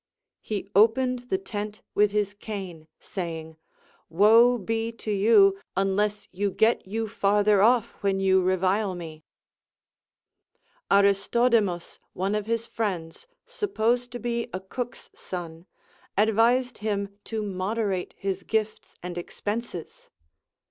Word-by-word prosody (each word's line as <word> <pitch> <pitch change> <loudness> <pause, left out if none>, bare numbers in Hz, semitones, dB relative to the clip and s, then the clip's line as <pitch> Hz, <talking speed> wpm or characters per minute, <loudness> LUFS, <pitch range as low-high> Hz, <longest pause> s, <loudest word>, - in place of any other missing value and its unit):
He 205 -2 -4
opened 245 +4 +3
the 380 - +2
tent 210 - -6
Avitli 210 0 +4
his 205 -1 -1
cane, 190 -6 -7
saying: 160 -4 -6 0.5
Woe 225 +8 +6
be 225 +2 -2
to 220 -1 -5
you, 200 -1 +5 0.2
unless 205 +2 0
you 200 +2 -1
get 220 +2 +2
you 225 +3 -2
farther 205 -1 +3
off 235 +1 +4
when 195 -1 +1
you 190 -1 +4
revile 185 +2 +1
me. 160 -3 -8 1.7
Aristodemus, 200 -1 +2
one 195 +3 -1
of 210 0 -2
his 230 0 -1
friends, 185 - -4 0.2
supposed 245 - -1
to - - -3
be 235 -1 -2
a 185 - -4
cook's 235 +5 -7
son, 170 -1 -7 0.5
advised 230 +4 +3
him 200 -1 -3
to 220 -1 -3
moderate 195 0 -2
his 195 -1 -3
gifts 215 +2 -3
and 175 -1 -4
expenses. 205 0 -6
205 Hz, 120 wpm, -26 LUFS, 190-225 Hz, 1.7 s, Woe